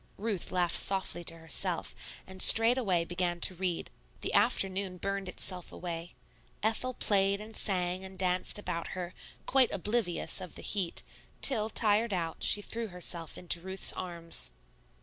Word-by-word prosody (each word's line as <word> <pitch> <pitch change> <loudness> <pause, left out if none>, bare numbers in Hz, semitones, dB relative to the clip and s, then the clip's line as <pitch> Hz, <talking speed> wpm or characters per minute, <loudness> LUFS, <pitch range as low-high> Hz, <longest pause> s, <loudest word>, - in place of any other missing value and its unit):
Ruth 205 -3 -3
laughed 175 -2 +1
softly 190 -3 0
to 165 - -3
herself, 160 -2 -3 0.3
and 190 0 -5
straightway 225 -7 +8
began 175 0 -2
to - - +2
read. 180 -1 -3 0.3
The - - -3
afternoon 190 -1 +1
burned 195 0 -3
itself 180 -1 -3
away. 170 -1 -7 0.5
Ethel 230 +4 0
played 200 -1 +3
and 215 +1 -10
sang 180 -1 +2
and 190 0 -10
danced 185 +1 +2
about 180 -5 -4
her, 180 0 -5 0.3
quite 260 -2 +3
oblivious 200 -2 -2
of 180 - -9
the - - -10
heat, 190 -5 -1 0.4
till, 220 -5 +4
tired 220 0 +1
out, 165 -3 -4
she 205 - +2
threw 230 +2 -4
herself 175 -3 -5
into 175 -1 -2
Ruth's 190 +1 +1
arms. 170 - -6
185 Hz, 150 wpm, -30 LUFS, 175-205 Hz, 0.5 s, straightway